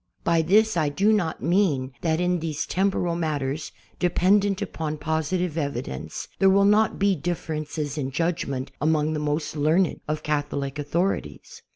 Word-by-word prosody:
Hy 170 Hz, -1 st, +3 dB
this 215 Hz, +6 st, +3 dB
I 155 Hz, -4 st, +2 dB
do 200 Hz, +9 st, +2 dB
not 175 Hz, -7 st, -1 dB
mean 165 Hz, -8 st, +2 dB
that 160 Hz, -1 st, +1 dB
in 180 Hz, 0 st, +1 dB
these 155 Hz, -2 st, -3 dB
temporal 185 Hz, -3 st, 0 dB
matters, 150 Hz, -3 st, -2 dB, 0.3 s
dependent 195 Hz, +3 st, +3 dB
upon 155 Hz, -1 st, -4 dB
positive 160 Hz, +2 st, -1 dB
evidence, 120 Hz, -, -4 dB
there 195 Hz, -, +6 dB
will 200 Hz, +1 st, +5 dB
not 210 Hz, +2 st, +3 dB
he 200 Hz, -1 st, +3 dB
dilTerences 155 Hz, -2 st, -3 dB
in 135 Hz, -2 st, -2 dB
judgment 140 Hz, -3 st, -2 dB
among 155 Hz, 0 st, +2 dB
the 155 Hz, -, -2 dB
most 150 Hz, +1 st, -2 dB
learned 155 Hz, +5 st, +2 dB
of 155 Hz, 0 st, -2 dB
Catholic 145 Hz, -2 st, -2 dB
authorities. 170 Hz, +7 st, -2 dB
160 Hz, 150 wpm, -25 LUFS, 150-180 Hz, 0.3 s, there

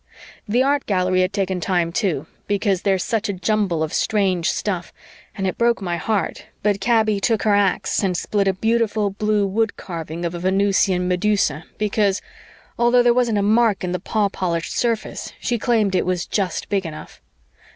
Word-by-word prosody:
The 240 Hz, +5 st, +2 dB
Art 280 Hz, +1 st, +1 dB
Gallery 185 Hz, -2 st, +2 dB
had 185 Hz, +1 st, +1 dB
taken 190 Hz, -3 st, -1 dB
time 175 Hz, -2 st, 0 dB
too, 175 Hz, -, -1 dB, 0.2 s
because 200 Hz, -2 st, 0 dB
there's 190 Hz, -2 st, +1 dB
such 220 Hz, -2 st, -1 dB
a -, -, 0 dB
jumble 185 Hz, -3 st, 0 dB
of 160 Hz, -, -4 dB
strange 190 Hz, -5 st, +1 dB
stuff, 180 Hz, -4 st, -2 dB, 0.4 s
and 195 Hz, -3 st, -3 dB
it 185 Hz, -, -2 dB
broke 235 Hz, 0 st, +3 dB
my 175 Hz, -3 st, -2 dB
heart 210 Hz, +3 st, -2 dB, 0.2 s
but 205 Hz, -1 st, +1 dB
Kaby 220 Hz, -1 st, +2 dB
took 220 Hz, +1 st, +1 dB
her 210 Hz, -, +3 dB
ax 200 Hz, -2 st, +1 dB
and 185 Hz, -2 st, 0 dB
split 200 Hz, +1 st, 0 dB
a 195 Hz, -, +3 dB
beautiful 220 Hz, 0 st, 0 dB
blue 210 Hz, 0 st, +1 dB
woodcarving 175 Hz, -6 st, -3 dB
of 170 Hz, -, -2 dB
a 175 Hz, -, -5 dB
Venusian 190 Hz, 0 st, +2 dB
medusa 180 Hz, -4 st, +1 dB
because, 205 Hz, -2 st, +1 dB, 0.6 s
although 240 Hz, +1 st, +4 dB
there 240 Hz, 0 st, +5 dB
wasn't 240 Hz, -3 st, +1 dB
a 200 Hz, -, +1 dB
mark 220 Hz, -1 st, +3 dB
in 180 Hz, -, -2 dB
the 180 Hz, -, -2 dB
paw 210 Hz, +3 st, 0 dB
polished 170 Hz, -4 st, -3 dB
surface, 230 Hz, -3 st, -2 dB
she 240 Hz, -1 st, -1 dB
claimed 215 Hz, -4 st, +1 dB
it 185 Hz, -, +1 dB
was 180 Hz, -1 st, -1 dB
just 195 Hz, -3 st, -2 dB
big 200 Hz, -2 st, 0 dB
enough. 155 Hz, -1 st, -10 dB
200 Hz, 180 wpm, -21 LUFS, 185-215 Hz, 0.6 s, there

